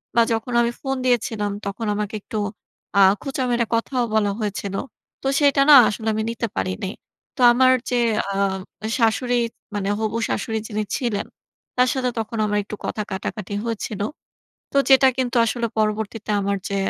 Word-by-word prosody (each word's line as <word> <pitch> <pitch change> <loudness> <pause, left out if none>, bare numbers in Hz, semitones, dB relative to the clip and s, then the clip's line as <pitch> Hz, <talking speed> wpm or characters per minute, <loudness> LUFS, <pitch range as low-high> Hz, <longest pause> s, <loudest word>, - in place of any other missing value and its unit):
বা 235 - +6
যখন 225 +2 -3
আমি 235 0 +1
ফোন 270 -1 -1
দিয়েছিলাম 220 -4 +1
তখন 205 +3 -4
আমাকে 210 +1 -3
একটু 215 - -6 0.6
আ - - +6 0.2
খোঁচা 270 -2 -2
মেরে 235 -1 +2
কথাও 245 +2 0
বলা 205 -2 +2
হয়েছিল। 200 -2 -3 0.5
তো - - -1
সেটা 280 -1 +4
না 290 - +11
আসলে 220 +1 -5
আমি 220 0 -1
নিতে 230 0 -3
পারিনি। 185 +1 -2 0.5
তো 260 - -5
আমার 255 +1 +5 0.2
যে 250 - 0 0.4
আম 195 -1 0 0.4
শাশুড়ি 245 +2 +2 0.4
মানে 200 -1 -1
হবু 220 +1 -1
শ্বাশুড়ি 220 -1 -2
যিনি 215 0 -2
ছিলেন 230 -6 -2 0.5
তার 250 0 +5
সাথে 255 -2 0
তখন 225 +1 -4
আমার 210 0 0
একটু 210 - -7
কথা 215 - -2
কাটাকাটি 205 +1 -4
হয়েছিল। 215 -2 -3 0.7
তো - - +2
যেটা 265 0 +7
কিন্তু 250 -2 -1
আসলে 235 +1 -1
পরবর্তীতে 215 0 -1
আমার 200 0 0
যে 200 - -2
225 Hz, 165 wpm, -22 LUFS, 205-245 Hz, 0.7 s, না